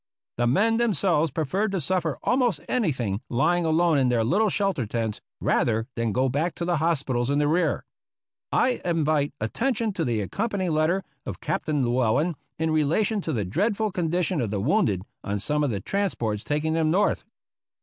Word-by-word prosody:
The 120 0 +2
men 220 - +3
themselves 190 -9 +2
preferred 180 +9 -1
to 190 - 0
suffer 165 -3 0
almost 245 - +2
anything 130 - -1
lying 170 +8 +2
alone 160 -1 +3
in 130 -2 +2
their 120 -2 +2
little 205 - +2
shelter 190 - 0
tents, 110 -1 -3 0.2
rather 115 -1 +1
than 115 -1 -1
go 130 +5 +1
back 150 +7 -1
to 170 - -3
the 175 -1 +1
hospitals 140 -6 0
in 140 - +1
the 145 0 +2
rear. 170 +4 +1 0.7
I 255 - +2
invite 155 -4 +1
attention 225 - -1
to 170 - -1
the 115 -5 0
accompanying 190 - -2
letter 160 +5 +1 0.2
of - - -5
Captain 150 -2 -1
Llew 120 +2 +1
ellen 145 +9 +1 0.2
in 160 0 0
relation 165 +8 +1
to 165 - -3
the 110 -8 -1
dreadful 210 - 0
condition 175 -2 0
of 115 - -1
the 100 -1 -2
wounded 105 - +1 0.2
on 100 0 -2
some 150 +9 0
of 145 - +1
the 105 -4 -2
transports 115 - -2
taking 150 +2 -1
them 160 -1 +2
North. 190 +6 +2
155 Hz, 180 wpm, -25 LUFS, 125-185 Hz, 0.7 s, men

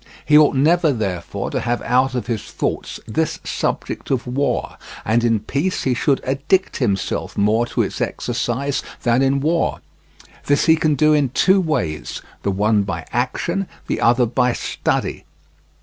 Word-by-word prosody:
He 150 - +4
ought 150 -2 +6
never, 160 +3 +3
therefore, 95 -8 -3
to - - -1
have 120 0 -1
out 130 +2 +2
of 125 - -2
his 115 -4 -2
thoughts - - -4
this - - -1
subject - - -3
of 130 -3 0
war, 135 +3 -1 0.3
and 115 +2 +2
in 115 -3 +2
peace 140 - -1
he 130 - +1
should 135 +3 +1
addict 140 +9 0
himself 100 -8 -1
more 110 +4 +2
to - - 0
its - - -4
exercise 125 +3 -2 0.2
than 120 +1 +3
in 135 0 +2
war; 165 +3 0 0.7
this 145 0 +3
he 160 - +6
can 155 -2 +1
do 155 +3 +4
in 145 -3 +2
two 190 +9 +3
ways, 85 - -2 0.2
the - - -1
one 105 +2 +2
by 95 -4 -4
action, 170 +10 -1 0.2
the - - -2
other 120 +1 +4
by 125 +1 +1
study. - - -2
125 Hz, 165 wpm, -20 LUFS, 115-145 Hz, 0.7 s, ought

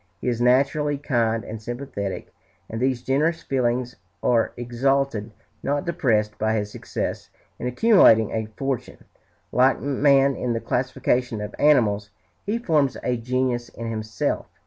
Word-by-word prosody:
He - - -5
is 120 -1 0
naturally 140 +4 +2
kind 115 -5 0
and 110 0 -7
sympathetic, 115 -4 -5 0.3
and 115 +1 -5
these 130 -2 0
generous 155 +6 +1
feelings 125 -1 -1 0.3
are 115 -2 +2
exalted, 120 -1 0 0.3
not 145 +1 -1
depressed, 115 -11 0
by 110 +1 +1
his 105 -1 -2
success - - -4 0.3
in 125 - -3
accumulating 125 - +5
a 110 -1 -2
fortune.... 135 -3 -4 0.5
Like 130 +1 +3
man 140 -1 +3
in 120 -1 -2
the 115 - -1
classification 125 -2 -1
of 105 0 -6
animals, 110 -9 +3 0.4
he 215 +3 0
forms 155 - +1
a 125 - 0
genus 120 0 -1
in 115 0 -6
himself. 110 -1 -2
125 Hz, 140 wpm, -23 LUFS, 115-140 Hz, 0.5 s, accumulating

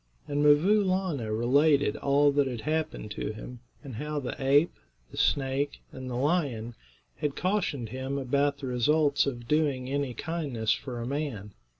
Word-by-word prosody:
And 145 +1 0
'Mvoo 170 +9 +5
Laana 185 - -1
related 140 +6 +3
all 145 0 +3
that 140 -1 +2
had 120 -4 -4
happened 155 -7 -2
to 105 - -3
him, 120 +3 -9 0.2
and 130 -6 -8
how 150 +2 -3
the 130 - -4
ape, 145 +5 +4 0.4
the - - -11
snake, 140 +1 +1
and 130 -1 -7
the 125 - -4
lion 130 -5 0 0.4
had 150 -3 -2
cautioned 175 - -1
him 130 +3 -4
about 140 +2 +1
the 140 - -7
results 140 +4 +2
of 120 -3 -4
doing 140 -4 +1
any 140 -3 -1
kindness 140 -10 -2
for 125 -3 -6
a 115 - -4
man. 130 -7 -3
140 Hz, 165 wpm, -28 LUFS, 125-150 Hz, 0.4 s, Mvoo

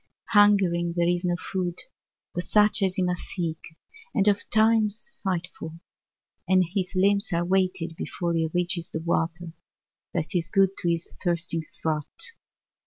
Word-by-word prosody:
Hungering 195 -5 +4
there 170 0 +3
is 175 +1 +1
no 175 -1 +1
food 180 -1 -3 0.6
but 175 - -1
such 210 +2 +4
as 190 -1 +2
he 185 - +1
must 180 -1 -1
seek 165 -4 -3 0.6
and 200 -3 +3
ofttimes 220 +3 +2
fight 180 -3 -1
for; 160 0 -6 0.8
and 185 -1 +5
his 190 -2 -1
limbs 200 +2 +3
are 170 0 +1
weighted 185 -3 0
before 170 +1 -3
he 160 -1 +1
reaches 175 -1 -1
the - - -3
water 165 0 -1 0.6
that 165 +3 -3
is 175 -3 0
good 195 -2 +4
to 175 - 0
his 170 0 0 0.2
thirsting 170 -2 0 0.2
throat. 160 - -3
180 Hz, 150 wpm, -26 LUFS, 170-195 Hz, 0.8 s, and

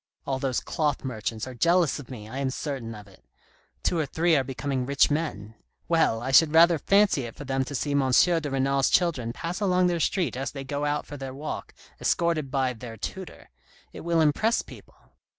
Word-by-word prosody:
All 135 -1 -2
those 130 -2 -1
cloth 150 -3 -1
merchants 110 -2 -3
are 130 - -8
jealous 170 +4 +2
of 140 - -11
me, 110 -5 -8
I 130 +5 -6
am 135 -1 0
certain 130 -5 -5
of 105 -1 -12
it; 95 - -20 0.6
two 170 - +1
or 155 - 0
three 165 +3 +2
are 135 - +2
be 130 0 -7
coming 135 -2 -2
rich 140 +3 +3
men. 130 -9 -3 0.3
Well, 160 -9 +2
I 130 - -2
should 155 +3 +5
rather 170 0 +6
fancy 195 -9 +3
it 115 - -9
for 145 - -8
them 135 0 0
to 145 - -6
see 145 +3 -2
M. 140 -2 +2
de 165 +3 +3
Renal's 135 0 +1
children 145 -10 +1
pass 170 - -5
along 185 -2 +3
the 175 -1 +1
street 165 - 0
as 135 +1 -4
they 135 -1 -6
go 145 +2 -3
out 145 0 -1
for 145 - -8
their 135 -1 -7
walk, 150 +3 -6 0.2
escorted 165 -5 0
by 130 -2 0
their 115 -1 -9
tutor. 185 - -8 0.4
It - - -8
will 170 -1 +1
impress 185 +10 +2
people. - - -14
140 Hz, 210 wpm, -26 LUFS, 130-165 Hz, 0.6 s, rather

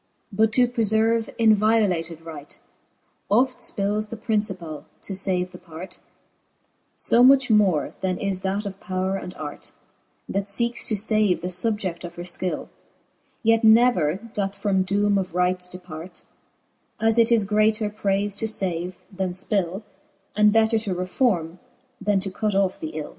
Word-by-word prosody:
But 220 +2 +3
to 250 0 +4
preferve 225 -1 +1
in 225 -2 +5
violated 200 -7 +1
right, 150 -3 -9 0.7
Oft 250 +5 +2
fpilles 210 +2 -2
the 230 - -6
principall, 195 - -3 0.2
to 200 - -5
fave 185 -1 -1
the 180 - -11
part; 180 +1 -10 1.0
So 235 - +3
much 265 -1 +6
more 195 -8 +3
then 185 -1 -1
is 195 -1 -2
that 195 +2 -2
of 195 -1 -6
powre 190 +1 -2
and 180 - -8
art, 145 -1 -8 0.5
That 195 0 -2
feekes 235 +4 0
to 215 0 -1
lave 210 -4 +3
the 180 - -3
fubjed 185 -1 -2
of 175 -1 -8
her 175 - -6
Ikill, 180 +1 -4 0.7
Yet 225 0 +3
never 220 -9 +5
doth 200 -2 -4
from 200 -2 +1
doome 200 +1 +2
of 185 -2 -5
right 180 0 +2
depart: 180 -1 -9 0.8
As 225 +1 +3
it 230 0 +4
is 230 -3 +4
greater 215 +1 +1
prayfe 200 -1 -1
to - - -1
fave, 185 -4 -2 0.2
then 190 -1 -2
fpill, 185 +1 -1 0.5
And 210 0 +5
better 225 +1 +3
to 205 -4 -3
reforme^ 180 -2 0 0.4
then 205 -1 +2
to 195 0 -4
cut 210 +1 -1
off 195 -1 +1
the 155 - -4
ill. 155 -1 -6
200 Hz, 155 wpm, -24 LUFS, 180-220 Hz, 1.0 s, much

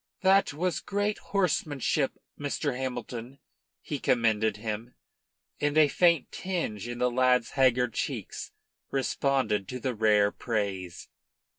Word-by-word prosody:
"That 190 0 +4
was 175 +4 -1
great 205 +1 -1
horsemanship, 150 -7 0 0.3
Mr. 145 -1 -2
Hamilton," 125 0 -5 0.4
he 145 - -4
commended 110 -4 +2
him; 110 +2 -5 0.6
and 145 +1 0
a 155 -2 +6
faint 170 -2 +3
tinge 165 - -3
in 120 0 -5
the 125 0 +1
lad's 125 -1 +3
haggard 125 -3 +3
cheeks - - -4 0.4
responded 130 -6 0
to 125 - -5
that 130 0 -1
rare 105 -2 +3
praise. 95 -6 -3
125 Hz, 120 wpm, -28 LUFS, 110-145 Hz, 0.6 s, a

